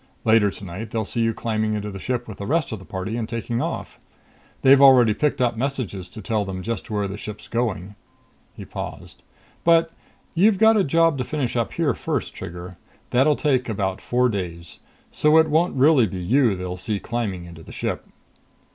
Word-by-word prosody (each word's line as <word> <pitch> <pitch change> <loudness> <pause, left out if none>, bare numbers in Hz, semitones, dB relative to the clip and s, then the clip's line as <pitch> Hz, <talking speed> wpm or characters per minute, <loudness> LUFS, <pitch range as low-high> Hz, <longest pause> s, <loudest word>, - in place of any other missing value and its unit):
Later 110 -2 +5
tonight 100 +3 -7
they'll 110 -2 -2
see 115 - -2
you 115 0 +2
climbing 110 -1 -1
into 105 0 -4
the 95 - -7
ship 120 +3 -3
with 110 - -9
the 100 - -5
rest 160 +1 0
of 110 - -4
the 95 - -13
party 95 +3 -4
and 115 -1 -3
taking 115 0 -2
off. - - -5 0.6
They've 135 +1 +7
already 125 -5 +7
picked 145 +4 0
up 120 -2 +1
messages 115 -8 -3
to 110 - -10
tell 110 +1 0
them 95 -2 -5
just 115 +2 -4
where 105 -2 -1
the 100 +2 -7
ship's 105 -1 -8
going." 105 -5 -2 0.6
He - - -9
paused. - - -8 0.4
"But 165 -1 +4 0.4
you've 200 +4 +4
got 220 +2 +6
a 205 - +3
job 165 -1 +2
to - - 0
finish 135 -4 -3
up 115 -2 -1
here 160 -6 +1
first, - - -3
Trigger. 90 +1 -8 0.3
That'll 135 +4 +4
take 130 -5 0
about 95 -3 -2
four 125 +1 +2
days. 85 -6 -5 0.3
So 150 +1 +4
it 160 -1 +4
won't 165 +4 +2
really 135 -3 +5
be 95 - -6
you 115 +5 +2
they 90 0 -5
see 100 +3 -3
climbing 105 -7 -3
into 85 -1 -11
the - - -12
ship." - - -3
115 Hz, 195 wpm, -23 LUFS, 100-135 Hz, 0.6 s, They've